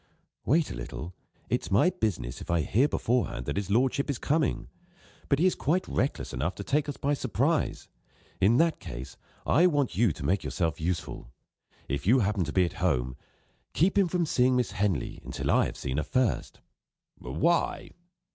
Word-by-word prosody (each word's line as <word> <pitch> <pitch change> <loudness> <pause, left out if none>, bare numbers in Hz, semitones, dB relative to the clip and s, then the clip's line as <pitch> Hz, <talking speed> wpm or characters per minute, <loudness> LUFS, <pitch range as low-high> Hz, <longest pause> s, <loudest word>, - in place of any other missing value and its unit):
"Wait 160 +4 +2
a - - -5
little. 75 +8 -7 0.3
It's - - -1
my 115 - +4
business, 105 - -3
if - - -9
I 85 -1 +2
hear 120 - +2
beforehand 120 - -1
that - - -3
his 100 -1 -2
lordship 130 +6 +1
is 140 - -1
coming. 150 +3 0 0.6
But 140 - +3
he 165 - +2
is 185 - +4
quite 175 +6 0
reckless 135 - -2
enough 75 +9 -2
to 100 - -6
take 145 +6 0
us 145 - -5
by 145 +1 0
surprise. 140 +4 0 0.5
In 110 +6 +4
that 165 -1 +2
case, - - -8 0.3
I 170 +6 +5
want 145 -6 0
you 110 -3 +3
to 70 - -7
make 95 +7 +1
yourself 80 -2 -2
useful. 80 -7 -3 0.6
If 70 +5 -3
you 125 +4 +5
happen 100 -2 +1
to 75 - -4
be 90 +1 +3
at 85 - -4
home, 65 -8 +1 0.6
keep 180 +5 +2
him 200 -2 +4
from 175 0 0
seeing 130 -3 +2
Miss 125 -6 0
Henley 100 - -1
until - - -2
I - - +4
have - - -8
seen 65 0 -3
her 75 - +1
first." 130 - -1 0.6
"Why?" 80 - 0
110 Hz, 185 wpm, -28 LUFS, -, 0.6 s, I